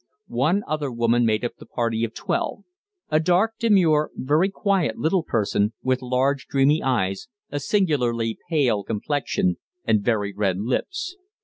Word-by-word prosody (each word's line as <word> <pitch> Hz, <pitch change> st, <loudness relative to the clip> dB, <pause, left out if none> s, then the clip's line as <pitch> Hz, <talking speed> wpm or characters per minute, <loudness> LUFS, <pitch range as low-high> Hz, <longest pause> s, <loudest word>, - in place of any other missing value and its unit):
One 165 Hz, +11 st, +1 dB
other 150 Hz, -3 st, -2 dB
woman 120 Hz, 0 st, +2 dB
made 110 Hz, +2 st, +1 dB
up 120 Hz, -, -4 dB
the -, -, -13 dB
party 115 Hz, -1 st, -1 dB
of 115 Hz, -1 st, -3 dB
twelve -, -, -2 dB, 0.5 s
a 155 Hz, -, +4 dB
dark, 180 Hz, +7 st, +2 dB
demure, 175 Hz, -9 st, +3 dB
very 150 Hz, +8 st, +2 dB
quiet 195 Hz, -4 st, 0 dB
little 170 Hz, +4 st, +1 dB
person, 105 Hz, -5 st, 0 dB
with 130 Hz, 0 st, +1 dB
large, 130 Hz, +2 st, 0 dB
dreamy 140 Hz, +3 st, +3 dB
eyes, 95 Hz, -8 st, -1 dB, 0.2 s
a 145 Hz, -, -2 dB
singularly 125 Hz, -, 0 dB
pale 130 Hz, -, +2 dB
complexion, 105 Hz, -, -1 dB, 0.3 s
and 110 Hz, -2 st, +3 dB
very 105 Hz, -3 st, 0 dB
red 95 Hz, -2 st, 0 dB
lips. 355 Hz, -, -3 dB
130 Hz, 145 wpm, -23 LUFS, 115-160 Hz, 0.5 s, a